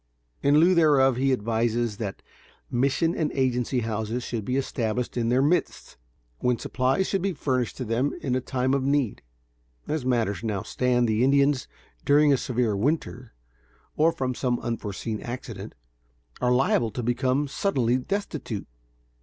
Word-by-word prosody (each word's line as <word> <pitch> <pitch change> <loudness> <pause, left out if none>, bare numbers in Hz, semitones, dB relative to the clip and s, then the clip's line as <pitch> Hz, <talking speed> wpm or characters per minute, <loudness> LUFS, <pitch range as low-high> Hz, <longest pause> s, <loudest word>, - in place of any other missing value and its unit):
In 145 +1 +4
lieu 175 +3 +5
thereof, 145 -6 +4
he 135 +1 +2
advises 115 -1 0
that 100 -3 -5 0.5
mission 140 +7 +1
and 155 -3 -1
agency 125 -1 0
houses 110 +2 -3
should 115 -3 -4
be 125 +6 -1
established 125 -3 -2
in 115 -2 0
their 125 +2 +3
midst, 165 +3 0 0.4
when 125 -1 +1
supplies 130 +11 0
should 195 -1 -1
be 195 0 0
furnished 130 -5 -1
to 130 - -4
them 120 +6 0
in 130 - -2
a 130 - +1
time 130 +1 -1
of 140 - +2
need. 135 -4 0 0.7
As 155 -3 -2
matters 115 -5 0 0.3
stand 125 -1 +1
now, - - 0
the 110 +2 +1
Indians, 140 0 +3 0.4
during 145 0 +5
a - - +3
severe 120 -4 0
winter, 125 0 -2 0.6
or 160 +2 +4
from 130 -4 -2
some 120 -1 -1
unforeseen 110 -1 -4
accident, 115 -4 -7 0.7
are 125 - +2
liable 125 -2 +2
to 120 +3 -5
become 130 +4 +1
suddenly 130 - +1
destitute. 155 - -4
125 Hz, 155 wpm, -26 LUFS, 120-140 Hz, 0.7 s, lieu